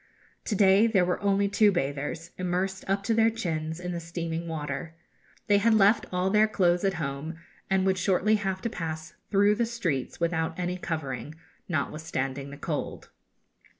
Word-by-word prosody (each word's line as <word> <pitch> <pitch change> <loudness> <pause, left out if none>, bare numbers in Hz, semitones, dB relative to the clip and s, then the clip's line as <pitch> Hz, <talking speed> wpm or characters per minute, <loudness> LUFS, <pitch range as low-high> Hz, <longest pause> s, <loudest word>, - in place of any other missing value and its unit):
To 215 - -1
day 200 +2 +5
there 195 -5 +3
were 180 - 0
only 200 0 +2
two 205 +1 +4
bathers, 150 +1 -3
immersed 185 +1 -1
up 195 +1 +1
to 225 - +1
their 225 0 +4
chins 160 -7 -3
in 180 0 -4
the 170 - -3
steaming 165 0 -4
water. 160 +1 -4 0.5
They 205 -1 +4
had 225 +2 +4
left 205 +1 +4
all 180 +1 0
their 215 +1 +5
clothes 180 -4 +2
at 195 -1 +1
home, 150 0 -4 0.3
and 190 -1 +2
would 190 -1 +2
shortly 195 +3 +2
have 190 -2 -3
to - - 0
pass 160 -1 -5 0.2
through 205 +1 +4
the 230 +2 0
streets 175 - -2
without 165 -1 -1
any 180 0 -2
covering, 150 -4 -4 0.3
notwithstanding 140 -3 -2
the 140 - -9
cold. - - -4
180 Hz, 170 wpm, -27 LUFS, 160-200 Hz, 0.5 s, day